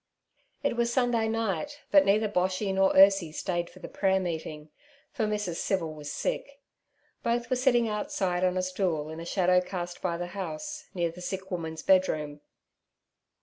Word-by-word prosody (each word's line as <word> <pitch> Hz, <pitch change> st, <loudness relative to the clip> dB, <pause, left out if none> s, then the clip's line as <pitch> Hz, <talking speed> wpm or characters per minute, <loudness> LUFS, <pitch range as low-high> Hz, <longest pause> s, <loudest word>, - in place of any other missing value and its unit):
It -, -, +1 dB
was 235 Hz, 0 st, +1 dB
Sunday 240 Hz, -3 st, +2 dB
night, 225 Hz, -, -2 dB
but 290 Hz, -1 st, +7 dB
neither 210 Hz, +2 st, +3 dB
Boshy 190 Hz, 0 st, 0 dB
nor 190 Hz, 0 st, +4 dB
Ursie 195 Hz, -4 st, +6 dB
stayed 175 Hz, +1 st, -2 dB
for -, -, -17 dB
the 185 Hz, -, -8 dB
prayer 190 Hz, -1 st, +1 dB
meeting, 160 Hz, -4 st, -5 dB, 0.4 s
for 220 Hz, -5 st, -1 dB
Mrs. 210 Hz, -5 st, -2 dB
Civil 170 Hz, -5 st, -1 dB
was 150 Hz, -1 st, -7 dB
sick. 280 Hz, 0 st, -3 dB, 0.6 s
Both 235 Hz, +1 st, -1 dB
were -, -, +4 dB
sitting 245 Hz, -2 st, +3 dB
outside 190 Hz, -4 st, -1 dB
on 185 Hz, 0 st, +2 dB
a 185 Hz, -, +1 dB
stool 180 Hz, -5 st, -1 dB
in 160 Hz, -, -7 dB
a 165 Hz, -, -6 dB
shadow 180 Hz, 0 st, +3 dB
cast 175 Hz, -1 st, -5 dB
by 170 Hz, -2 st, -1 dB
the 175 Hz, -, -3 dB
house, 195 Hz, -, -5 dB
near 170 Hz, -2 st, 0 dB
the 180 Hz, +2 st, -12 dB
sick 190 Hz, +2 st, -5 dB
woman's 160 Hz, -3 st, -4 dB
bedroom. 155 Hz, -6 st, +2 dB
185 Hz, 170 wpm, -28 LUFS, 170-215 Hz, 0.6 s, but